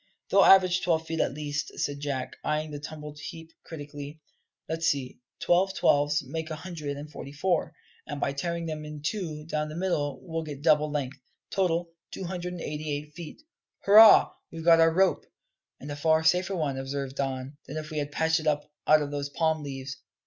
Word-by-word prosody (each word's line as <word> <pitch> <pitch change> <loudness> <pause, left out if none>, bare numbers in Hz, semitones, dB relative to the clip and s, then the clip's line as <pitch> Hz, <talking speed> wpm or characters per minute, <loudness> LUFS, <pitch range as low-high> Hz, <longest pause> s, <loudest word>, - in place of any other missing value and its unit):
"They'll 195 0 +6
average 185 -1 +6
twelve 160 -2 +1
feet 160 0 -3
at 135 - 0
least," 145 -1 -4
said 145 0 -2
Jack, 140 -3 -3
eyeing 155 0 -1
the 145 - -5
tumbled 150 0 -8
heap 165 +1 -9
critically. 145 -1 -8 0.5
"Let's 165 +1 -1
see 135 -3 -1 0.2
twelve 190 +2 +2
twelves 145 +2 +3
make 160 0 -5
a 155 - -3
hundred 155 -4 -6
and 145 +1 -7
forty 140 - -8
four; 165 +1 0 0.3
and 145 -2 -5
by 140 - 0
tearing 170 +4 -3
them 155 -1 -4
in 150 -1 -8
two 155 -4 -3
down 155 -1 -2
the 155 - -7
middle 150 -7 -1
we'll 165 -2 -3
get 145 -3 -8
double 150 -1 +4
length. 140 -2 -3 0.3
Total, 175 -3 +1 0.2
two - - -7
hundred 180 0 -4
and 175 - -6
eighty 150 +1 -4
eight 150 +1 -4
feet. 170 - -10 0.4
Hurrah, 215 +2 +8 0.2
we've 165 -1 -7
got 165 -1 +7
our 165 0 +6
rope!" 190 +2 +2 0.6
"And 145 - -7
a - - -3
far 160 +2 +2
safer 180 +4 +2
one," 145 -6 -1
observed 135 0 -4
Don, 135 +1 -3
"than 150 - -6
if 155 0 -6
we 155 - -2
had 145 0 -3
patched 160 +2 +2
it 155 - -5
up 150 0 0 0.2
out 155 0 +6
of 145 - -5
those 145 -1 -3
palm 160 +1 0
leaves. 135 -2 -6
155 Hz, 200 wpm, -28 LUFS, 145-165 Hz, 0.6 s, Hurrah